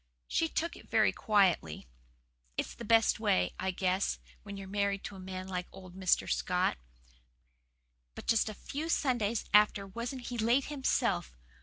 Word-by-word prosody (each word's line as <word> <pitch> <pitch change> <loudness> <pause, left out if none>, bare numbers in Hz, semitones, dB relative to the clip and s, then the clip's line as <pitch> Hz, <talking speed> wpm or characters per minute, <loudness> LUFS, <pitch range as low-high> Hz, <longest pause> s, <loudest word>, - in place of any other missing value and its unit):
She 325 - +1
took 335 +2 -2
it - - -15
very - - +4
quietly. 185 - +1 0.7
It's - - -2
the - - -9
best 225 0 +4
way, 90 - +2
I 190 - -1
guess, 185 +1 0 0.2
when 200 -1 -8
you're 195 -1 -7
married 200 0 -1
to 200 - -6
a - - -10
man 185 0 -6
like 180 -1 -3
old 185 -2 -12
Mr. 185 -2 +2
Scott. - - 0 1.4
But - - -9
just 225 -1 +2
a 215 - -7
few 300 +9 -5
Sundays 240 -8 +1
after 210 -1 +5
wasn't 235 +5 -5
he 240 -1 -4
late 235 +5 +3
himself! 260 - 0
200 Hz, 160 wpm, -32 LUFS, 185-235 Hz, 1.4 s, after